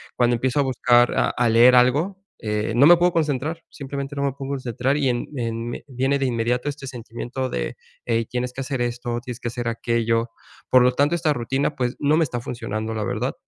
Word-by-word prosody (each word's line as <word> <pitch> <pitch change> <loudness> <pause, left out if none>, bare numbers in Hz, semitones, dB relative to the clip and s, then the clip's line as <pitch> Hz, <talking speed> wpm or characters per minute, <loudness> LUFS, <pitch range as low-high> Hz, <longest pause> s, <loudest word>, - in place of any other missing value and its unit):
cuando 120 0 +3
empiezo 130 +3 0
a - - +2
buscar 120 -2 +3
a - - +3
a 120 -1 +1
leer 120 +3 +6
algo, 150 +11 +2 0.2
eh, 105 0 -1
no 125 +5 +5
me 175 - +9
puedo 175 +1 +2
concentrar. 155 0 -1
Simplemente 140 0 -6
no 140 - -2
me 140 - +1
puedo 135 0 -6
concentrar 130 0 -1
y, 140 -3 +1
en, 120 -1 -2
en 115 0 -3 0.2
viene 135 +2 0
de 135 - 0
inmediato 125 +2 0
este 140 -1 -7
sentimiento 125 +1 -5
de: - - -3 0.3
"Ey, 115 -1 +1
tienes 125 +2 -3
que 135 - -5
hacer 130 -2 -3
esto, 120 0 -2
tienes 125 0 -8
que 120 - -2
hacer 120 0 -4
aquello". 115 0 0 0.4
Por 130 -1 +6
lo 125 0 +3
tanto, 145 +5 +2
esta 160 -3 +1
rutina, 135 +3 -1
pues, 125 0 -2
no 145 +1 +3
me 165 - +3
está 125 -5 -3
funcionando, 115 -2 -4
la 110 - -2
verdad. - - -2
125 Hz, 215 wpm, -23 LUFS, 120-140 Hz, 0.4 s, me